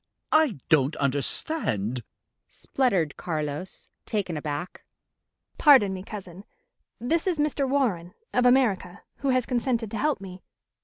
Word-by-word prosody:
"I 310 - +3
don't 150 -2 +3
understand," 130 - +1 0.5
spluttered 195 - -1
Carlos, 155 +1 -4 0.2
taken 195 -6 -2
aback. 150 +3 -5 0.8
"Pardon 260 -10 +6
me, 185 - -5
cousin. 190 -2 -9 0.6
This 315 - -1
is 355 -3 +1
Mr. 295 -2 0
Warren, 210 -11 -1 0.2
of 250 0 +3
America, 240 -8 +1
who 275 - -2
has 255 -2 +2
consented 240 -3 -1
to 225 - -4
help 300 -3 +1
me. 185 -1 -10
200 Hz, 120 wpm, -26 LUFS, 165-260 Hz, 0.8 s, Pardon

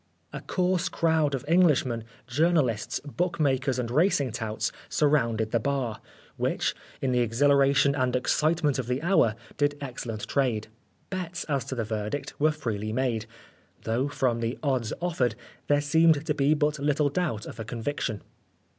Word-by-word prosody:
A - - -5
coarse 180 -1 0
crowd 160 -4 +2
of 130 - -6
Englishmen, 150 -9 +3 0.2
journalists, 135 -3 +1
bookmakers 140 -4 0
and 120 -2 -2
racing 145 - +2
touts 110 -2 -2 0.2
surrounded 115 -7 +1
the 115 - +2
bar, 125 -3 -2 0.4
which, - - 0 0.3
in 130 - +1
the 125 - +2
exhilaration 140 +3 +4
and 130 -3 0
excitement 150 +2 +1
of 125 - -3
the 125 +1 0
hour, 165 - +3 0.2
did 145 0 +1
excellent 120 -5 -5
trade. 120 -6 0 0.4
Bets 180 -2 -4
as 140 -5 -1
to 135 - -4
the 115 - -1
verdict 110 +5 -3
were 155 +2 +4
freely 110 -8 -3
made, 115 -2 -1 0.6
though, 120 +5 0
from 125 -4 0
the 115 +1 -2
odds 130 -6 0
offered, 130 -10 0 0.3
there 145 0 +3
seemed 160 0 +4
to 155 - +1
be 145 +1 +3
but 150 0 0
little 145 0 +2
doubt 145 -9 -2
of 110 - -9
a - - -3
conviction. 115 -1 -3
135 Hz, 155 wpm, -27 LUFS, 115-150 Hz, 0.6 s, exhilaration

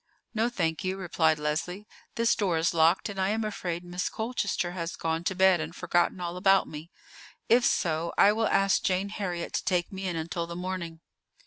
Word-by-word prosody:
"No, 225 +1 +1
thank 165 -7 -1
you," 190 +1 -2
replied 165 -4 +1
Leslie; 160 +7 -3 0.3
"this 230 0 +3
door 190 -6 0
is 165 +2 +1
locked, 165 +5 +3
and 200 -2 -4
I 190 - +1
am 220 +1 0
afraid 180 -5 -3
Miss 175 +1 -3
Colchester 220 -6 -2
has 170 -1 -4
gone 165 0 -2
to 190 - 0
bed 190 -2 +4
and 160 +2 -6
forgotten 175 +1 +1
all 175 0 -4
about 195 +1 +4
me. 155 +2 -9 0.6
If 240 +2 +5
so, 165 -1 +1
I 205 - +6
will 225 0 +1
ask 195 0 +3
Jane 190 +2 0
Heriot 180 -5 -4
to - - -1
take 180 -2 0
me 190 0 -4
in 175 - -2
until 170 +1 -3
the 170 - -7
morning." 175 -2 -5
180 Hz, 200 wpm, -28 LUFS, 170-195 Hz, 0.6 s, I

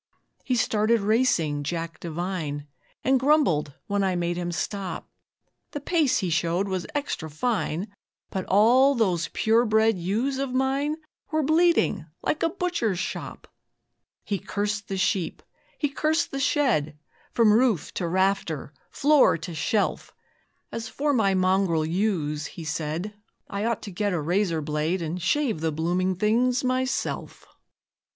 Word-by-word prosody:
He 255 - 0
started 220 -1 +2
racing 200 - +2
Jack 165 +3 -4
Devine, 165 -3 -4 0.4
And 265 0 +3
grumbled 255 - +2
when 200 -1 0
I 190 -1 +1
made 175 0 -1
him 175 0 -3
stop. 195 +2 -4 0.7
The 290 - -3
pace 305 -2 +2
he 175 - -1
showed 170 +4 +1
was 185 -2 -3
extra 285 - -3
fine, 185 +1 -1 0.4
But 190 -1 -3
all 250 +8 +5
those 185 -8 +1
pure 225 +2 +3
bred 220 -2 +3
ewes 230 +10 -1
of 270 -2 -2
mine 270 +3 +1 0.3
Were 310 -1 +1
bleeding 320 - +2 0.2
like 305 - -1
a 330 - +2
butcher's 340 - -1
shop. 190 - -5 0.8
He 200 -2 -2
cursed 205 +1 -3
the 195 - -3
sheep, 185 -3 -1 0.3
he 295 - +1
cursed 310 +3 0
the 275 - -3
shed, 235 - +1 0.4
From 225 -3 +5
roof 230 - +2
to 175 - -2
rafter, 180 -5 0 0.2
floor 290 - +4
to 165 +1 -7
shelf; 180 +7 -1 0.6
As 225 -1 -5
for 290 +5 0
my 200 -6 +2
mongrel 185 -3 +2
ewes, 160 -4 -1
he 170 - -9
said, 160 +5 -3 0.3
I 200 +1 -3
ought 230 -3 -1
to 205 - -6
get 205 +2 -1
a 175 - 0
razor 170 +1 0
blade 155 +4 -1
And 165 +3 -4
shave 225 - +1
the 160 -1 0
blooming 175 +4 0
things 235 +6 +2
myself. 255 +1 -2
200 Hz, 145 wpm, -25 LUFS, 170-250 Hz, 0.8 s, all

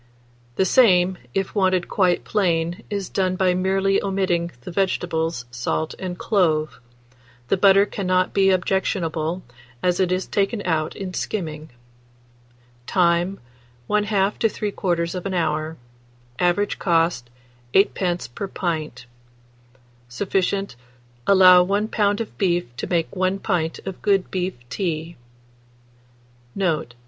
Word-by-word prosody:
The 190 - +2
same, 185 -5 +4 0.2
if 195 -1 -1
wanted 185 -3 +1
quite 180 -3 +1
plain, 170 -4 0
is 200 -3 -3
done 185 -1 0
by 185 -1 +2
merely 195 +1 +1
omitting 190 -3 0
the 150 - -8
vegetables, 170 -6 -1
salt, 120 +6 -2
and 180 -2 -5
clove; 160 -8 +1 0.7
the - - +4
butter 195 +1 +6
cannot 185 -2 0
be 195 -1 +4
objectionable, 180 -3 0 0.4
as 180 -1 +1
it 185 -1 +2
is 185 +1 0
taken 205 +1 -1
out 160 -3 -1
in 190 -2 -6
skimming. 155 -6 -4 1.2
Time. 175 +1 +2 0.5
1/2 210 -1 +1
to 225 - +4
3/4 185 -2 -2
hour. 155 -1 -1 0.6
Average 180 +3 +1
cost, 165 -8 +1 0.5
8d. 180 - +1
per 200 - -4
pint. 160 -8 -4 1.0
Sufficient. 195 +5 -1 0.5
Allow 185 -2 +8
1 200 +4 0
lb. 205 -1 +1
of 225 - -6
beef 175 -10 0
to - - -4
make 170 +1 -1
1 185 +1 +1
pint 175 -5 -1
of 190 -1 -6
good 195 -2 +1
beef 185 0 -2
tea. 165 - -3 1.4
Note. 160 -10 -1
185 Hz, 115 wpm, -22 LUFS, 170-195 Hz, 1.4 s, Allow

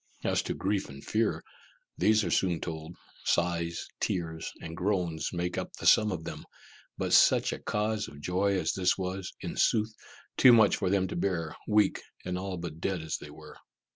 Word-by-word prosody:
As - - +1
to - - -4
grief 100 0 -1
and 70 0 -10
fear, 110 0 0 0.5
these 110 0 +3
are 85 - -2
soon 90 -2 +2
told 80 +1 -6 0.3
sighs, 85 -1 0
tears, 80 -3 -2
and 80 0 -7
groans 90 -4 -1
make 90 0 -2
up - - -6
the - - -8
sum 105 -1 +6
of 85 -3 -4
them 75 -2 -7 0.5
but - - -1
such - - +5
a - - -6
cause 105 0 -1
of 70 - -11
joy 95 +5 +1
as 80 -3 0
this 90 -1 +2
was, 95 0 -4
in - - -5
sooth, 110 0 +2 0.4
too 125 - +8
much 110 -3 +5
for 95 - 0
them 95 -1 +2
to - - -4
bear, 85 -3 -1
weak 105 -2 +3 0.2
and 90 0 -2
all 95 0 -4
but 85 -2 -6
dead 95 -4 -1
as 80 - -2
they - - -10
were. - - -12
90 Hz, 190 wpm, -29 LUFS, 85-100 Hz, 0.5 s, too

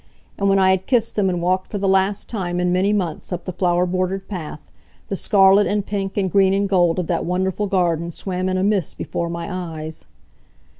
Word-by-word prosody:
And 200 0 +2
when 195 - +4
I 190 -1 +4
had 190 0 -1
kissed 235 -3 +2
them 200 -3 +2
and 175 -2 -2
walked 185 +1 0
for 205 - -3
the 195 0 -1
last 195 +1 +2
time 180 -5 -3
in 180 0 +1
many 185 +3 +2
months 185 -6 -2
up 180 -1 -4
the 185 - -4
flower 180 0 +1
bordered 185 +1 -2
path, 165 -6 -6 0.5
the 195 - -1
scarlet 195 +1 +4
and 205 -1 -1
pink, 195 -1 -3
and 190 -3 0
green 195 0 +4
and 200 0 +1
gold 175 -3 +2
of 180 - -1
that 170 0 -1
wonderful 190 +3 -1
garden 170 -3 0
swam 185 +2 -3
in 185 - 0
a 185 - 0
mist 200 -5 0
before 170 0 -3
my 170 0 -5
eyes. 160 -3 -6
185 Hz, 215 wpm, -21 LUFS, 175-195 Hz, 0.5 s, when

